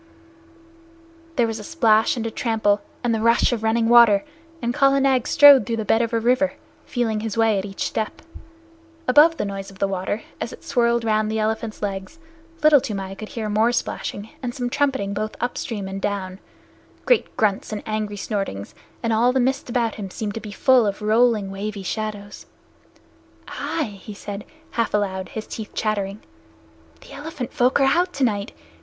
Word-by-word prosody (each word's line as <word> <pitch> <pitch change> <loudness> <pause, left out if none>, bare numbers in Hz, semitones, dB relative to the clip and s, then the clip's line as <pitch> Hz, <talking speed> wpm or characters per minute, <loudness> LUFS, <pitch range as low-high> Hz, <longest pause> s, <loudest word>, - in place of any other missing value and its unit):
There 240 - +3
was 225 -1 -3
a - - -8
splash 225 -6 +3
and 230 - -3
a 225 - -2
trample, 215 -3 +1 0.2
and 240 -1 +1
the 220 - -1
rush 230 +2 +3
of 235 -3 -1
running 225 +1 +1
water, 235 -2 +6 0.3
and 240 -4 -2
Kala 275 +1 +4
Nag 265 -3 +2
strode 285 -4 +8
through 230 - -1
the 220 - -3
bed 225 +3 +3
of 230 0 -1
a 230 - +1
river, 250 +5 +2 0.3
feeling 230 -4 -1
his 220 0 -4
way 225 -3 +3
at 190 - -4
each 195 -1 -5
step. 220 - -3 0.8
Above 300 +6 +6
the - - -1
noise 195 -1 -5
of 195 - -15
the 200 - +1
water, 195 +3 -3 0.2
as - - -4
it - - -12
swirled 235 -3 +1
round 215 -1 +1
the 220 - -1
elephant's 220 0 -2
legs, 195 +8 -4 0.5
Little 300 -3 +7
Toomai 195 -4 -4
could 215 +2 -8
hear 220 -2 -4
more 215 +3 +2
splashing 220 -3 -3
and 245 -2 -4
some 245 -1 -3
trumpeting 265 -9 0
both 215 +1 -3
upstream 230 -4 -3
and 195 0 -5
down 195 -2 -3 0.7
great - - +2
grunts 205 -1 0
and 210 - -4
angry 215 -1 -3
snortings, 195 - -4 0.3
and 230 - +1
all 235 +3 +4
the 260 - +1
mist 260 +1 0
about 235 -2 0
him 195 - -5
seemed 205 +2 -4
to 225 - -4
be 210 - -8
full 255 0 +4
of 200 +1 -3
rolling, 215 -2 +3
wavy 200 0 -5
shadows. 205 0 -5 1.0
"Ai!" 210 -12 -4
he 210 - -9
said, 205 0 -7 0.3
half 230 -2 0
aloud, 190 -3 -2
his 220 - -6
teeth 220 -1 -8
chattering. 205 -1 -2 0.8
"The - - -14
elephant 290 -4 -6
folk 250 +3 +3
are - - +4
out 350 +7 +2
tonight. 215 -7 0
220 Hz, 185 wpm, -22 LUFS, 205-245 Hz, 1.0 s, strode